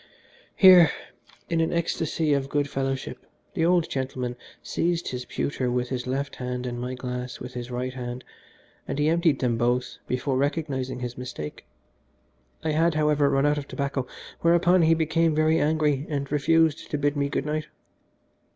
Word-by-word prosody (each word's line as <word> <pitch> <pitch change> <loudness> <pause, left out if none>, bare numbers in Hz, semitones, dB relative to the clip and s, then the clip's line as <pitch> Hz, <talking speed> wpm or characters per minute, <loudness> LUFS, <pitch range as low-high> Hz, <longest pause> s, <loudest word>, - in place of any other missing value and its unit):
Here, 185 -4 +8 0.6
in 165 -1 +1
an 165 - +1
ecstasy 165 -2 0
of 135 -1 -1
good 145 -1 0
fellowship, 135 -1 -3 0.3
the 170 -4 0
old 175 -1 +3
gentleman 130 -2 -3 0.3
seized 170 0 -1
his 125 -1 -5
pewter 130 -1 -2
with 125 0 -1
his 125 -1 -3
left 140 +2 -3
hand 125 0 -4
and 120 -1 -4
my 125 +1 -3
glass 125 0 -5
with 125 - -8
his 125 0 -6
right 125 +1 -3
hand, 125 0 -6 0.6
and - - -3
he 150 +1 +2
emptied 165 -4 +2
them 120 -3 +1
both 125 +1 0
before 130 +1 -1
recognising 135 -3 -2
his 125 0 -5
mistake. 120 -12 -7 1.0
I 160 - 0
had, 165 +1 +2
however, 150 -2 +3
run 135 +1 +2
out 145 0 +2
of 140 - -8
tobacco, 140 -2 -3 0.3
whereupon 175 +2 +4
he 165 0 +5
became 160 0 +1
very 155 +1 +3
angry, 150 -2 +1
and 140 -2 -3
refused 155 +1 +2
to 150 - -1
bid 145 0 0
me 140 0 0
good 140 - -2
night. 155 0 -2
140 Hz, 170 wpm, -25 LUFS, 125-160 Hz, 1.0 s, Here